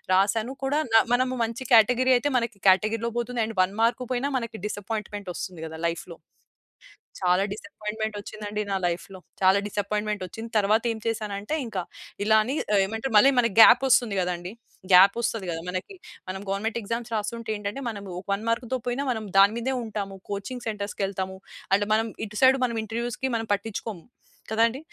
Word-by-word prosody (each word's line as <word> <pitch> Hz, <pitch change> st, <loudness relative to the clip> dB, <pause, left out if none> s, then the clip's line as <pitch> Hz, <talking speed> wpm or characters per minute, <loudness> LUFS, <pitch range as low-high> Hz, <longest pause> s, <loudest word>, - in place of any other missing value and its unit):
రాసాను 220 Hz, +6 st, +1 dB
కూడా 290 Hz, +3 st, +1 dB
న -, -, +5 dB, 0.2 s
మనము 255 Hz, +1 st, +2 dB
మంచి 230 Hz, +4 st, -6 dB
కేటగరీ 250 Hz, +3 st, +5 dB
అయితే 290 Hz, +3 st, -1 dB
మన 235 Hz, -, 0 dB, 0.2 s
కేటగరీలో 215 Hz, +5 st, +2 dB
పోతుంది 240 Hz, 0 st, -2 dB
అండ్ 220 Hz, -3 st, -7 dB
1 190 Hz, +2 st, -3 dB
మార్క్ 235 Hz, +2 st, +2 dB
పోయిన 245 Hz, +2 st, -1 dB
మనకి 230 Hz, -1 st, -6 dB
డిసప్పాయింట్‌మెంట్ 205 Hz, -1 st, -5 dB
ఒస్తుంది 180 Hz, -4 st, -6 dB
కదా! 160 Hz, 0 st, -8 dB
లైఫ్‌లో. 170 Hz, 0 st, -8 dB, 1.1 s
చాలా 180 Hz, +1 st, +3 dB
డిసప్పాయింట్‌మెంట్ 210 Hz, +1 st, -5 dB
ఒచ్చిందండి 210 Hz, 0 st, -5 dB
నా 195 Hz, -, +1 dB
లైఫ్‌లో. 175 Hz, +2 st, -4 dB, 0.2 s
చాలా 190 Hz, +1 st, +5 dB
డిసప్పాయింట్‌మెంట్ 210 Hz, 0 st, -2 dB
ఒచ్చింది. 225 Hz, +5 st, -8 dB
తరువాత 210 Hz, +2 st, +3 dB
ఏమి 220 Hz, -, -4 dB
చేశానంటే 210 Hz, +2 st, -2 dB
ఇంకా 190 Hz, -5 st, -3 dB, 0.4 s
ఇలా 220 Hz, +1 st, +5 dB
అని 260 Hz, +5 st, -2 dB, 0.2 s
ఆహ్, 200 Hz, -, +5 dB
ఏమంటారు? 225 Hz, +5 st, -4 dB
మళ్ళి 270 Hz, +6 st, +8 dB
మనకి 230 Hz, -5 st, +2 dB
గ్యాప్ 245 Hz, +4 st, +8 dB
ఒస్తుంది 240 Hz, -6 st, +3 dB
గదండీ. 180 Hz, +1 st, -3 dB, 0.4 s
గ్యాప్ 195 Hz, +4 st, +8 dB
ఒస్తది 220 Hz, -4 st, -2 dB
గదా 165 Hz, 0 st, -4 dB
మనకి. 185 Hz, -, -5 dB, 0.3 s
మనం 190 Hz, +1 st, -5 dB
గవర్నమెంట్ 215 Hz, +4 st, -1 dB
ఎగ్జామ్స్ 230 Hz, +2 st, -4 dB
రాస్తుంటే 220 Hz, +2 st, -3 dB
ఏంటంటే 205 Hz, +6 st, -5 dB
మనం 200 Hz, -2 st, -8 dB, 0.2 s
ఒక -, -, -16 dB
వన్ 210 Hz, -, -5 dB
మార్క్‌తో 245 Hz, +2 st, -1 dB
పోయినా 265 Hz, +4 st, -1 dB
మనం 220 Hz, -2 st, -5 dB
దాని 200 Hz, +3 st, +6 dB
మీదే 260 Hz, +3 st, -1 dB
ఉంటాము. 200 Hz, -3 st, -5 dB, 0.2 s
కోచింగ్ 220 Hz, +5 st, -5 dB
సెంటర్స్‌కి 205 Hz, -1 st, -3 dB
ఎళ్తాము 190 Hz, -1 st, -4 dB, 0.4 s
అండ్ 205 Hz, -, -1 dB
మనం 225 Hz, +1 st, +1 dB, 0.2 s
ఇటు 210 Hz, 0 st, -7 dB
సైడ్ 260 Hz, +1 st, +6 dB
మనం 235 Hz, -1 st, -4 dB
ఇంటర్వ్యూస్‌కి 240 Hz, +4 st, -3 dB
మనం 225 Hz, -1 st, -4 dB
పట్టించుకోము. 200 Hz, -2 st, -5 dB, 0.5 s
కదండీ? 230 Hz, +3 st, +2 dB
215 Hz, 170 wpm, -26 LUFS, 200-235 Hz, 1.1 s, మళ్ళి